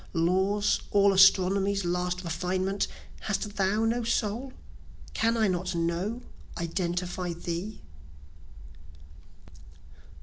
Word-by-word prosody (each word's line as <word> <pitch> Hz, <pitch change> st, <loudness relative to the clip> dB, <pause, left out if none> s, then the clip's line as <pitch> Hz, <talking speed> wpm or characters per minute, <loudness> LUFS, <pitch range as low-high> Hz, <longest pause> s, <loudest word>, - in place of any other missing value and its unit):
Law's, 190 Hz, +5 st, +2 dB
all 200 Hz, -1 st, +4 dB
Astronomy's 195 Hz, +1 st, +4 dB
last 180 Hz, +1 st, -1 dB
refinement? 185 Hz, +3 st, -1 dB, 0.3 s
Hast 210 Hz, 0 st, -3 dB
thou 200 Hz, +3 st, +2 dB
no 235 Hz, +1 st, 0 dB
soul? 235 Hz, +3 st, -1 dB, 0.6 s
Can 230 Hz, +1 st, +1 dB
I 220 Hz, -1 st, +3 dB
not 180 Hz, -1 st, -1 dB
know, 175 Hz, +8 st, -2 dB, 0.3 s
identify 175 Hz, +1 st, -2 dB
thee? 175 Hz, +5 st, -5 dB
190 Hz, 90 wpm, -28 LUFS, 180-205 Hz, 0.6 s, all